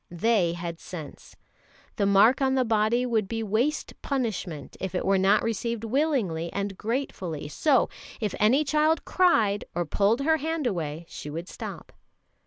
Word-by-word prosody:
They 175 -1 +2
had 170 -1 -5
sense. 160 -5 -9 0.6
The 200 - +2
mark 205 +7 +5
on 265 0 +2
the 260 -1 +2
body 225 +2 +2
would 225 -5 0
be 225 +2 -3
waste 235 +9 0
punishment 210 - -3
if 190 -1 -4
it - - -1
were 195 0 +3
not 195 +2 +4
received 230 0 -2
willingly 225 - 0
and 200 0 -3
gratefully; 190 - -3
so 265 - +2 0.3
if 210 -4 -2
any 245 +8 +4
child 305 +2 +2
cried 225 - +3
or 175 0 0
pulled 205 - +2
her 315 +3 +3
hand 320 0 -2
away, 165 -6 -2
she 150 - -8
would 165 +4 -5
stop. - - -8
215 Hz, 160 wpm, -26 LUFS, 180-260 Hz, 0.6 s, mark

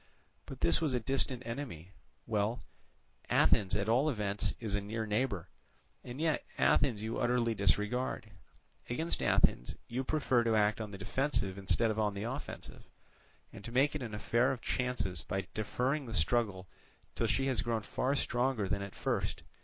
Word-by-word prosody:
But - - -9
this 85 - +4
was 150 -6 +1
a - - +2
distant 130 +1 0
enemy. 115 - -6 0.3
Well, 110 +1 0 0.7
Athens 100 -1 +4
at 100 0 0
all 130 +7 +3
events 105 -6 -1
is 110 -4 -3
a 105 - +1
near 110 +2 -3
neighbour, 105 -5 -1 0.5
and 125 +2 -7
yet 160 -1 +1
Athens 115 -7 +3
you 110 +1 -2
utterly 120 -1 +2
disregard; 105 +5 0 0.6
against 160 +8 -1
Athens - - +2
you 125 +3 -2
prefer 130 -4 +2
to 115 -1 +2
act 105 +1 +3
on 110 - -4
the 100 - -8
defensive 100 -1 0
instead 100 +4 +1
of 110 - -2
on 105 -2 +1
the 100 - -3
offensive, 130 +5 -6 0.7
and - - -10
to 115 - -7
make 135 +4 +3
it 150 - -3
an 115 -4 -4
affair 120 +5 +2
of 130 - -3
chances 125 -9 -1
by 95 +1 -3
deferring 130 +6 -1
the 115 - -4
struggle 95 +1 +1 0.5
till 115 - 0
she 135 +5 +1
has 130 -6 +1
grown 115 -2 -1
far 130 +6 0
stronger 120 -5 0
than 100 +1 -1
at 100 -1 -7
first. - - -2
115 Hz, 170 wpm, -33 LUFS, 100-130 Hz, 0.7 s, this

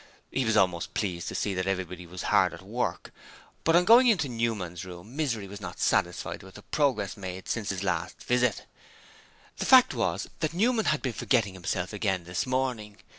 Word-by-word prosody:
He 130 - 0
was 110 -1 +2
almost 90 -4 +1
pleased 90 -4 -2
to - - -4
see 100 - -1
that 95 0 -2
everybody 90 -2 -3
was 90 +1 -7
very - - -3
hard - - +4
at - - -13
work, - - -3 0.5
but 165 - +3
on 175 +1 +5
going 240 +5 +7
into 185 -11 +3
Newman's 110 -8 -2
room 90 +6 -10
Misery 120 -10 -1
was 100 +1 -9
not 90 -2 -7
satisfied 90 0 0
with 95 0 -14
the - - -11
progress 135 -10 0
made 95 -2 -7
since 110 -3 -2
his 95 -1 -2
last 90 -3 -2
visit. 125 -3 +1 0.9
The - - -2
fact - - +7
was - - -1
that 155 +1 -2
Newman 225 +3 +2
had 150 - +1
been 130 -3 -1
forgetting 110 -5 +1
himself 95 +1 -3
again 95 -4 -1
this 90 +7 -3
morning. 125 -5 -2
105 Hz, 195 wpm, -28 LUFS, 90-130 Hz, 0.9 s, going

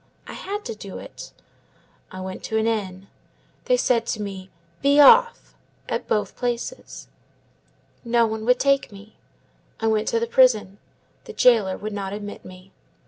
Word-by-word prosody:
I - - -9
had 410 +2 -6
to 465 - -4
do - - -9
it. - - -11 0.8
I 185 -1 -8
went 185 0 -7
to 220 - -2
an 220 - +1
inn. 195 -4 -3 0.6
They - - +3
said 235 - +1
to 215 - -3
me, 195 -2 -7 0.3
'Be 280 +1 +4
off,' 470 - +5 0.3
at - - -3
both 205 -2 -1
places. 245 - -5 1.0
No 235 -1 +2
one 220 0 -4
would 250 +1 +3
take 275 -3 +1
me. 205 +2 -14 0.6
I 225 - -3
went 220 -1 +1
to 230 - +1
the 230 - -1
prison; 225 -5 +3 0.5
the 450 - -9
jailer 225 - +3
would 215 0 -6
not 195 -1 -4
admit 205 0 -7
me. 185 +1 -14
220 Hz, 160 wpm, -23 LUFS, 200-255 Hz, 1.0 s, off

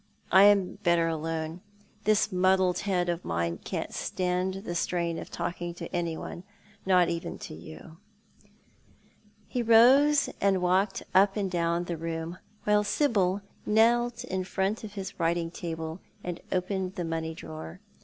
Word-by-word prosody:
I 190 +1 +8
am 200 -1 +3
better 170 -3 +3
alone. 160 +1 -3 0.4
This 215 0 +3
muddled 185 0 +3
head 185 -3 0
of 175 0 -2
mine 85 0 -2
can't - - -4
stand 185 +1 -2
the 175 - -4
strain 170 -1 -1
of - - -8
talking 175 0 -4
to - - -7
anyone 170 0 -3 0.2
— - - -28
not 180 -2 +5
even 170 0 -4
to - - -8
you," 80 - -11 1.5
He 245 - -2
rose 265 +6 +6
and 195 -1 +3
walked 185 +2 +1
up 195 +2 +4
and 195 -3 -1
down 170 0 0
the 175 -1 -4
room, 165 +2 -4 0.2
while 210 0 +3
Sibyl 205 -6 +1 0.2
knelt 235 +2 +3
in 190 0 -2
front 195 +4 -1
of 210 -2 -7
his 195 -2 -7
writing 165 0 0
table 165 -1 -5 0.2
and 175 -1 -5
opened 185 0 -1
the 175 - -3
money 160 0 -3
drawer. 160 +2 -8
180 Hz, 150 wpm, -28 LUFS, 170-200 Hz, 1.5 s, I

